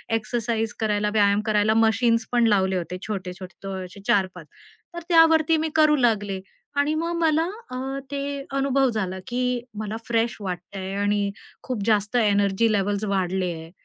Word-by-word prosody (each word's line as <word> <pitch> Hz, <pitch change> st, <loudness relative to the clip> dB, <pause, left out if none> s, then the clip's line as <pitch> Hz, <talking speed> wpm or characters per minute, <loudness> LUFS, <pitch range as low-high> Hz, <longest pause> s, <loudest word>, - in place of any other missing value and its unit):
exercise 225 Hz, 0 st, -2 dB
करायला 210 Hz, -2 st, +1 dB
व्यायाम 205 Hz, -1 st, +3 dB
करायला 215 Hz, 0 st, +2 dB
मशीन्स 225 Hz, +1 st, +3 dB
पण 240 Hz, -1 st, +3 dB
लावले 190 Hz, -3 st, +2 dB
होते 180 Hz, +1 st, -4 dB
छोटे-छोटे 185 Hz, -3 st, -6 dB
तो 195 Hz, -, -4 dB
असे 180 Hz, +3 st, -12 dB
4-5 185 Hz, -4 st, +1 dB, 0.5 s
तर 345 Hz, -, -5 dB
त्यावरती 325 Hz, -1 st, +5 dB
मी 315 Hz, +1 st, -1 dB
करू 305 Hz, -1 st, +5 dB
लागले 210 Hz, -7 st, +1 dB, 0.4 s
आणि 285 Hz, +2 st, +2 dB
मग 335 Hz, +2 st, -1 dB
मला 325 Hz, 0 st, +2 dB, 0.6 s
ते 280 Hz, -, -2 dB, 0.2 s
अ, 275 Hz, 0 st, -9 dB
अनुभव 275 Hz, -1 st, +2 dB
झाला 190 Hz, -5 st, -3 dB
की 250 Hz, 0 st, -1 dB, 0.2 s
मला 215 Hz, 0 st, -4 dB
फ्रेश 230 Hz, -1 st, 0 dB
वाटतंय 190 Hz, 0 st, -5 dB
आणि 205 Hz, 0 st, +1 dB, 0.3 s
खूप 245 Hz, -6 st, -3 dB
जास्त 210 Hz, 0 st, +1 dB
एनर्जी 205 Hz, 0 st, +2 dB
लेव्हल्स 205 Hz, 0 st, 0 dB
वाढले 190 Hz, -2 st, 0 dB
आहे, 160 Hz, 0 st, -10 dB
215 Hz, 150 wpm, -24 LUFS, 195-250 Hz, 0.6 s, त्यावरती